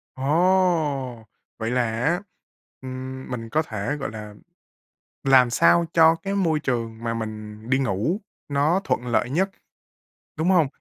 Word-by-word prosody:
Ồ! 150 -5 +1 0.3
Vậy 115 0 -2
là 125 0 +2
á, 145 +11 0 0.6
ừm, 130 0 -7
mình 115 -2 -5
có 155 +6 +2
thể, 110 -1 -3
gọi 140 -6 -4
là, 105 -1 -8 0.9
làm 130 -2 +6
sao 170 +7 +4
cho 160 -1 +6
cái 195 +4 -4
môi 165 -6 +1
trường 115 -4 -2
mà 115 0 -1
mình 110 -1 -6
đi 130 - +4
ngủ 130 - 0 0.3
nó 145 +6 +2
thuận 125 -1 -1
lợi 120 0 +1
nhất, 190 +7 +1 0.9
đúng 160 +3 +1
hông? 175 -6 +4
130 Hz, 145 wpm, -24 LUFS, 115-160 Hz, 0.9 s, làm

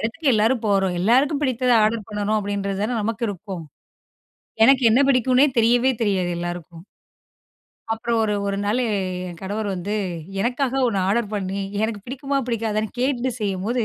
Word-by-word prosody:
எடத்துக்கு 280 +8 -2
எல்லாரும் 225 +2 +2
போறோம். 195 -3 +1
எல்லாருக்கும் 270 - +3
பிடித்தத 255 -2 +1
ஆர்டர் 215 -1 -1
பண்றோம். 210 +1 -1
அப்படீன்றது 200 -1 -3
தானே 245 +3 -1
நமக்கு 225 +2 -2
இருக்கும். 190 -3 -7 1.0
எனக்கு 270 +1 +5
என்ன 235 - +4
பிடிக்கும்னே 255 +1 +4
தெரியவே 240 +3 +4
தெரியாது 190 -4 0
எல்லாருக்கும். 175 -1 -6 1.1
அப்புறம் 230 +1 -1
ஒரு 210 -1 0
1 200 0 -1
நாள் 215 +5 +1
என் 185 -4 -3
கணவர் 205 +2 -3
வந்து, 190 +3 -3 0.5
எனக்காக 250 +4 0
ஒண்ணு 200 -4 -1
ஆர்டர் 210 +1 0
பண்ணி, 195 -1 -3 0.2
எனக்கு 220 -2 -3
பிடிக்குமா 275 +2 -2
பிடிக்காதான்னு 220 -1 -2
கேட்டுட்டு 255 -1 0
செய்யும்போது. 210 +4 -1
215 Hz, 145 wpm, -22 LUFS, 195-245 Hz, 1.1 s, எனக்கு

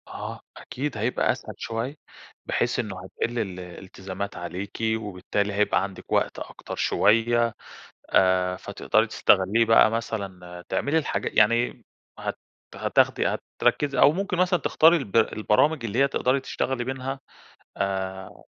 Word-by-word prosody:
آه - - -7 0.2
أكيد 135 -2 -5
هيبقى 115 +4 +1
أسهل - - -6
شوية، 115 +5 -4 0.5
بحيث - - 0
إنه 105 -5 -3
هتقِل 115 +5 -3
ال 95 -5 -3
الإلتزامات 95 +2 -7
عليكِ، 90 +3 -6 0.2
وبالتالي 100 0 -2
هيبقى 105 +1 +2
عَندِك 100 -1 -8
وقت - - +1
أكتر - - -8
شوية 115 +1 +2 0.6
آآ، 90 -1 +3
فتقدَري - - 0
تستغلّيه 100 +5 +3
بقى، 115 -1 +6
مثلًا 95 -6 -5
تعملي 145 +3 +1
الحاجا 155 - -2
يعني 115 +3 +2 0.3
هت - - -4 0.4
هتاخدي - - +2 0.3
هتركّزي 140 -2 +1
أو 145 - +7
ممكن 190 +2 -2
مثلًا 180 0 +2
تختاري 165 +2 +5
الب 120 - -4
البرامج 115 +6 +2
اللي 115 +1 -3
هي 140 +1 +5
تقدرَي 135 0 +1
تشتغلي 130 -1 -2
منها 130 +1 -4 0.6
آآ 95 -1 -4
110 Hz, 130 wpm, -25 LUFS, 95-130 Hz, 0.6 s, أو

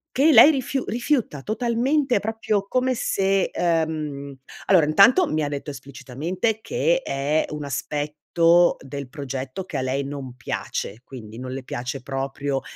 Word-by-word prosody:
che 295 +5 +5
lei 300 - +9
rifiu 270 -2 -2
rifiuta 240 - -1
totalmente, 245 +3 +1
proprio 215 -2 -1
come 255 0 +1
se, 195 -4 +1
ehm 155 -4 -1 0.3
allora 175 -6 +5
intanto 235 - +5
mi 155 - -1
ha 145 - -1
detto 145 +1 -5
esplicitamente 155 - -4
che - - +1
è 145 +3 0
un 150 -1 -5
aspetto 150 +5 +1
del 135 0 -7
progetto 135 +4 -5
che 175 - -9
a 130 - -1
lei 130 +2 -1
non 135 -3 -7
piace, 115 -3 -4
quindi 115 -4 -10
non 130 0 -6
le 130 0 -5
piace 125 +1 -5
proprio 135 +1 -3
155 Hz, 145 wpm, -23 LUFS, 135-220 Hz, 0.3 s, lei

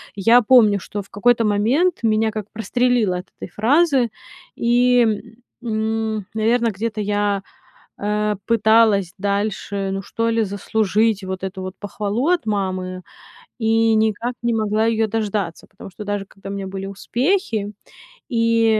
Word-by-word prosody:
я 230 +5 +5
помню, 215 -4 +5
что 205 +3 -6
в 200 - -16
какой-то 230 +3 +2
момент 235 - +1
меня 220 0 +2
как 215 -1 -6
прострелило 230 -3 +1
от 180 - -7
этой - - -6
фразы. 260 - +2 0.5
И, 245 +1 +3 0.6
м, 220 -2 -2
наверно, 230 +2 +2
где-то 215 +2 -3
я, 205 -1 0 0.6
э, 210 0 -1
пыталась 220 -4 +3
дальше, 200 0 -2
ну, 195 0 -3
что 230 +4 -2
ли, 225 -1 +1
заслужить 210 +1 0
вот 190 0 -5
эту 190 0 -5
вот 185 +1 -7
похвалу 210 +5 -2
от 355 -9 +1
мамы, 185 -3 -2 0.6
и 225 -1 +3
никак 220 +3 0
не 235 -1 +1
могла 215 0 +1
ее 225 -1 +2
дождаться. 205 -5 -3
Потому 195 - -12
что 200 +4 -9
даже 205 -1 -2
когда 195 0 -12
у - - -4
меня 195 -1 -4
были 195 0 -5
успехи 225 - -1 0.6
и, 230 -2 +2
215 Hz, 145 wpm, -21 LUFS, 200-230 Hz, 0.6 s, я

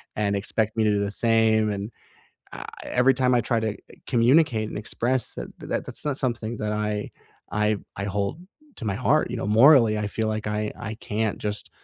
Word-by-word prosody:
and 100 -1 0
expect 110 +2 -1
me 110 - +3
to 105 - +3
do 100 - +1
the 100 0 -1
same, 110 -1 +3
and, 100 +2 -4 0.6
uh, - - -7 0.2
every 125 +2 +3
time 125 -1 +2
I - - +4
try 115 0 0
to, 110 -1 0
uh, - - -10 0.3
communicate 120 -2 +3
and - - -7
express 120 +4 -1
that, - - -6
that - - -3
that's - - -5
not 145 -3 -1
something 120 -4 -2
that 105 0 -2
I 105 -1 -2 0.4
I 105 0 +2 0.2
I 100 - -3
hold 100 - -2 0.4
to 115 - -7
my 100 -2 -1
heart, 130 +3 +2
you 125 - -3
know, 115 - -3
morally, 115 0 +6
I 105 - -1
feel 110 +1 -2
like 110 0 -3
I 105 0 -2
I 110 +1 -5
can't 110 0 -2
just, 105 0 -4
110 Hz, 210 wpm, -25 LUFS, 105-120 Hz, 0.6 s, morally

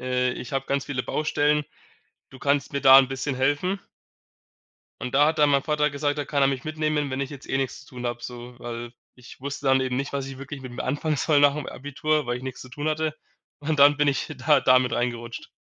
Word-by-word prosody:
äh, 125 0 0
ich 125 - -8
habe 135 0 -1
ganz 140 0 0
viele 130 -3 -2
Baustellen. 150 0 +1 0.7
Du 130 - -13
kannst 140 -1 +1
mir 140 - -1
da 135 0 +10
'n 135 - +4
bisschen 135 +1 -3
helfen.“ 145 +9 0 1.2
Und 125 +1 -5
da 145 +2 +6
hat 160 0 0
dann 150 -1 +5
mein 140 -1 +3
Vater 150 -1 +1
gesagt, 145 +1 -1
da 145 - -1
kann 140 0 0
er 135 - +5
mich 135 -1 -3
mitnehmen, 155 -2 -1
wenn 130 +1 -2
ich 140 0 -3
jetzt 140 -2 -10
eh - - 0
nix 135 -1 -2
zu 130 - -17
tun 125 0 -4
habe, 120 0 -4
so. 120 0 -8
Weil 120 0 -6 0.2
ich 125 0 -14
wusste 140 +1 -5
dann 135 0 +4
eben 130 -1 -1
nicht, 140 +2 -3
was 140 -1 -2
ich 135 -1 -8
wirklich 140 +1 -7
mit 130 -2 -8
mir 120 - -5
anfangen 145 +3 -1
soll 145 +1 +3
nach'm 145 0 +3
Abitur, 150 +2 -1
weil 120 0 -1
ich 125 - -9
nix 130 -1 -6
zu 130 - -10
tun 145 +5 -4
hatte 155 0 -1 0.5
und 150 +1 -1
dann 145 +1 +7
bin 145 0 +2
ich 140 +3 -1
da 140 +2 +4
da 130 0 +6
mit 125 -1 -1
reingerutscht. 120 -1 -3
140 Hz, 240 wpm, -25 LUFS, 130-145 Hz, 1.2 s, da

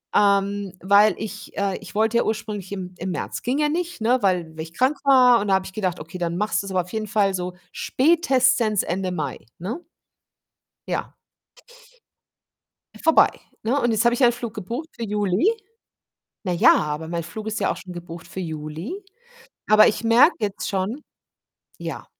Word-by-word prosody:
ähm, 200 -1 +2
weil 200 +2 +5
ich 210 0 -8
äh, 200 -1 0
ich - - -12
wollte 220 +2 +2
ja - - +3
ursprünglich 210 -3 -4
im 180 -2 -6
im 185 +2 -4
März - - -4
ging 255 +4 -1
ja 300 - +3
nicht, 345 -1 -3
ne, 245 +3 +3
weil 180 -4 +2
weil - - -4
ich 165 +1 -12
krank 260 +8 +1
war 255 -3 +6
und 210 - -3
da 190 - +5
habe 190 0 0
ich 190 - -9
gedacht: 185 -5 -2
„Okay, 165 +4 -8
dann 170 0 -2
machst 205 -2 0
du's 195 - -7
aber 185 -1 +2
auf 180 - -15
jeden 215 -1 -2
Fall 205 -2 +2
so 180 -1 -3 0.2
spätestens 260 - +2
Ende 185 +1 -2
Mai, 150 -7 -3 0.2
ne?“ 230 - -5 1.1
Ja. - - -3 1.9
Vorbei, 325 - +6 0.4
ne? 255 +6 +1
Und 240 - +2
jetzt 220 +1 +1
habe 235 - +4
ich 245 - -1
einen 240 -1 +6
Flug 235 -2 -6
gebucht 235 - -5
für 235 - -8
Juli. 210 - +1 0.9
Na 185 -3 -2
ja, 170 - +6
aber 150 +1 -3
mein 170 0 -2
Flug 210 +7 -8
ist 220 0 -2
ja - - +1
auch - - -8
schon 185 - -9
gebucht 170 -1 -9
für 190 - -7
Juli. 160 - -6 0.7
Aber 215 0 +8
ich 215 - +1
merke 240 +9 +6
jetzt 205 -2 -2
schon 205 +9 -2 0.8
ja, - - -6
205 Hz, 185 wpm, -23 LUFS, 180-235 Hz, 1.9 s, Aber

